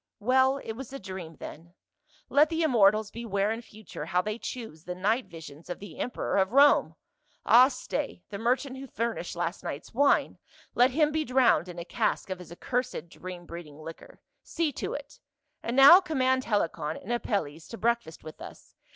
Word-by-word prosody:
Well, 260 +4 +3
it - - -5
was 250 +3 -8
a 275 - -5
dream 185 -6 -8
then. 170 +5 -11 0.5
Let 295 +2 +4
the 330 0 0
immortals 215 -6 +4
beware 210 -3 -1
in 225 +1 -3
future 215 -9 -9
how 180 +1 +1
they 215 +2 -4
choose 220 -13 -7
the 180 - -5
night 215 +6 0
visions 165 -2 -12
of 175 - -4
the 195 -6 -11
emperor 250 - -2
of 190 +3 +2
Rome. 285 +2 +5 0.3
— - - -39
Ah, 245 +3 +8
stay, 225 -9 -4
the 200 - -5
merchant 255 +3 0
who 270 - -8
furnished 230 -8 -3
last 175 +1 -3
night's 145 - -6
wine, 280 +4 +2 0.3
let 245 +2 +5
him 300 +3 +2
be 310 0 0
drowned 250 - +3
in 175 - -9
a 170 - -5
cask 185 - -1
of 185 - -4
his 180 -2 -12
accursed 245 -1 -3
dream 180 0 -9
breeding 170 -4 -9
liquor. 160 +1 -11 0.2
See 330 -3 -1
to - - -4
it. - - -9 0.4
And 235 - -3
now 285 +8 +10
command 260 -6 +1
Helicon 165 -7 -1
and 235 - -5
Apelles 165 -10 -2
to 230 - -8
breakfast 235 -8 -1
with 155 0 -11
us. - - -12
220 Hz, 185 wpm, -28 LUFS, 175-260 Hz, 0.5 s, now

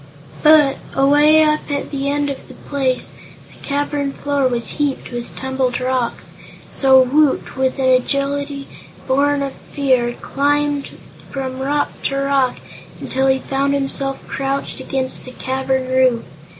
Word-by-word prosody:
But, 300 -3 +6 0.2
away 295 +3 +5
up 305 0 +1
at 285 -1 -3
the 280 -1 -1
end 285 0 0
of 275 - -8
the - - -12
place, 265 -3 -2 0.4
the - - -18
cavern 285 -1 -1
floor 285 -2 0
was 235 -2 -2
heaped 285 -3 -1
with 240 -1 -6
tumbled 265 -2 -1
rocks, 255 -1 -2 0.4
so 265 -1 +5
Woot, 275 +3 +2
with 260 0 0
an 265 - 0
agility 275 +2 0 0.4
born 280 +1 +2
of 275 -1 -4
fear, 255 -4 0
climbed 290 +2 0 0.4
from 260 -1 -4
rock 285 +2 0
to 275 - 0
rock 275 -2 +1 0.4
until 265 +1 0
he 265 0 +4
found 275 +1 0
himself 275 0 -3
crouched 270 +1 -3
against 260 -1 -2
the 255 - -9
cavern 265 0 -1
roof. 255 -2 +3
275 Hz, 140 wpm, -19 LUFS, 260-285 Hz, 0.4 s, But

